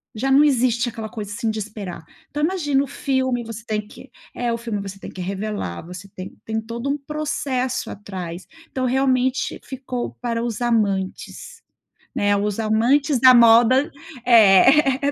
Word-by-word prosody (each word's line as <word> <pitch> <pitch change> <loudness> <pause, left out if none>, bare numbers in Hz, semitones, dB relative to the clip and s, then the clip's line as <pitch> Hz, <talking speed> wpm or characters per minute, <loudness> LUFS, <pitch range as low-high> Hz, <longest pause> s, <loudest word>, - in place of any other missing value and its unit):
já 270 +5 -1
não 280 +2 +6
existe 245 -4 +2
aquela 225 -2 -6
coisa, 210 -3 -7
assim, 220 +2 -2
de 215 - -4
esperar. 195 -5 -7 0.3
Então 295 +1 -3
imagina 300 -6 +1
o - - -6
filme, 260 -3 -1
você 225 -1 -8
tem 215 -2 -2
que 260 +4 -14 0.3
é, 240 -1 -1
o - - -2
filme 225 -3 -4
você 195 0 -8
tem - - -9
que 185 - -8
revelar, 195 - -4
você 180 +2 -10
tem 185 0 -8
tem 220 0 -2
todo 235 +4 -5
um 285 - 0
processo 275 -5 -3
atrás. 185 -3 -7 0.2
Então 260 -1 -2
realmente, 260 0 0
ficou 255 -2 -5
para 235 -1 -2
os 235 -1 -4
amantes, 220 - -2 0.5
né, 205 0 +2
os 205 +1 -2
amantes 245 +6 +2
da 255 +1 +8
moda 235 +4 +5 0.3
é, 255 +6 +5
235 Hz, 165 wpm, -21 LUFS, 210-265 Hz, 0.5 s, da